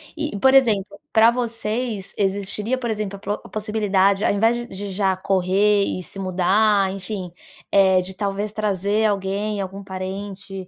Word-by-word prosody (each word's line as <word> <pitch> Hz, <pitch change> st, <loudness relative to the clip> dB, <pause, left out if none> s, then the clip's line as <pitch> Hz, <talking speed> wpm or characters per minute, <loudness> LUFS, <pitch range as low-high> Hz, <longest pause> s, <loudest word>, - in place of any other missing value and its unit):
e 305 Hz, -8 st, -3 dB
por 265 Hz, +5 st, +5 dB
exemplo, 210 Hz, -7 st, +3 dB
pra 225 Hz, +1 st, +6 dB
vocês 230 Hz, -3 st, -3 dB
existiria, 200 Hz, +4 st, -1 dB
por 245 Hz, -2 st, -3 dB
exemplo, 210 Hz, -2 st, -3 dB
a -, -, -16 dB
pro 200 Hz, -, -4 dB
a -, -, -13 dB
possibilidade. 205 Hz, -2 st, +1 dB
Ao -, -, +3 dB
invés 225 Hz, +4 st, +3 dB
de 240 Hz, 0 st, -4 dB
de 200 Hz, -2 st, -7 dB
já 190 Hz, 0 st, +1 dB
correr 195 Hz, +2 st, +2 dB
e 185 Hz, -, -3 dB
se 195 Hz, -, -11 dB
mudar, 195 Hz, +2 st, +2 dB
enfim, 190 Hz, -2 st, -6 dB, 0.4 s
eh, 190 Hz, -2 st, +5 dB
de 185 Hz, +1 st, -8 dB
talvez 200 Hz, +1 st, -2 dB
trazer 210 Hz, 0 st, 0 dB
alguém, 205 Hz, +1 st, -1 dB
algum 195 Hz, +1 st, -6 dB
parente 190 Hz, 0 st, -6 dB
200 Hz, 165 wpm, -22 LUFS, 190-215 Hz, 0.4 s, pra